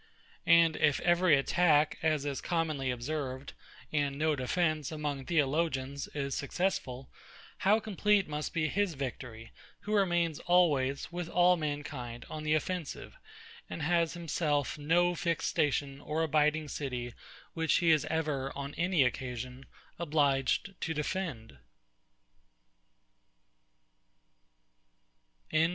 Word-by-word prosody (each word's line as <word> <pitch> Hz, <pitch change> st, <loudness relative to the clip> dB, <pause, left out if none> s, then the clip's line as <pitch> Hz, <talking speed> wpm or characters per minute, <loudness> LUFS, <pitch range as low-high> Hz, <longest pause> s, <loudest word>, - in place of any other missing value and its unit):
And 170 Hz, -1 st, +6 dB
if 145 Hz, -3 st, +3 dB
every 175 Hz, -3 st, +4 dB
attack, 150 Hz, +1 st, +3 dB
as 155 Hz, -2 st, +1 dB
is 140 Hz, -2 st, -3 dB
commonly 155 Hz, -6 st, -1 dB
observed, 130 Hz, +1 st, -4 dB, 0.4 s
and 145 Hz, -2 st, 0 dB
no 155 Hz, 0 st, +1 dB
defence, 155 Hz, +2 st, 0 dB
among 145 Hz, -3 st, -4 dB
Theologians, 140 Hz, -3 st, 0 dB
is 140 Hz, -2 st, -2 dB
successful; 140 Hz, -5 st, -2 dB, 0.5 s
how 210 Hz, +3 st, +4 dB
complete 210 Hz, -1 st, +1 dB
must 150 Hz, 0 st, -4 dB
be 155 Hz, -2 st, 0 dB
his 195 Hz, +1 st, 0 dB
victory, 125 Hz, -4 st, -6 dB, 0.3 s
who 210 Hz, -, -4 dB
remains 175 Hz, -6 st, +2 dB
always, 145 Hz, -7 st, +2 dB
with 175 Hz, -1 st, -4 dB
all 180 Hz, +1 st, +4 dB
mankind, 145 Hz, -6 st, -5 dB
on 155 Hz, -, -5 dB
the 155 Hz, 0 st, +1 dB
offensive, 175 Hz, 0 st, -4 dB, 0.5 s
and 160 Hz, -, -5 dB
has 170 Hz, +1 st, +1 dB
himself 150 Hz, -4 st, -1 dB
no 170 Hz, +4 st, +2 dB
fixed 170 Hz, -1 st, -1 dB
station 140 Hz, -1 st, 0 dB
or 155 Hz, +2 st, -1 dB
abiding 155 Hz, 0 st, +2 dB
city, 125 Hz, -5 st, -4 dB, 0.4 s
which 160 Hz, -2 st, +1 dB
he 170 Hz, -2 st, +4 dB
is 155 Hz, -3 st, +4 dB
ever, 150 Hz, -4 st, -1 dB
on 140 Hz, +1 st, -5 dB
any 175 Hz, -4 st, +3 dB
occasion, 125 Hz, +1 st, -4 dB, 0.3 s
obliged 145 Hz, +2 st, +1 dB
to 160 Hz, -, -2 dB
defend? 150 Hz, -7 st, -4 dB
150 Hz, 115 wpm, -31 LUFS, 140-170 Hz, 0.5 s, And